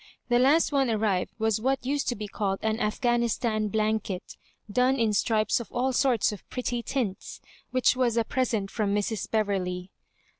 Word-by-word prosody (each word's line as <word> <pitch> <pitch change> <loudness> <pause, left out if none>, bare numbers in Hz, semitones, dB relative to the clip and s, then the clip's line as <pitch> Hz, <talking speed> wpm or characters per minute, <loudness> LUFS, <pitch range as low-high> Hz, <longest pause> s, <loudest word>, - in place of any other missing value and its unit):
The 240 0 +4
last 290 +7 +4
one 275 -3 +2
arrived 210 -4 0
was 220 -1 0
what 265 +1 0
used 280 +2 -1
to 245 - -1
be 210 -1 -5
called 195 -1 -2
an 220 0 0
Aff 210 -2 -1
ghanistan 235 -2 +1
blanket, 215 -3 -1 0.3
done 250 +5 +2
in 225 -4 +1
stripes 215 +1 +2
of 235 - -8
all 255 +2 0
sorts 245 -5 +2
of 210 - -10
pretty 245 -1 -2
tints, 230 -6 -3 0.3
which 255 0 +3
was 245 -2 +1
a 230 - +3
present 225 -5 -1
from 205 -3 0
Mrs. 205 0 -2
Bev 220 -1 +2
erley. 180 -2 -3
220 Hz, 180 wpm, -27 LUFS, 210-250 Hz, 0.3 s, The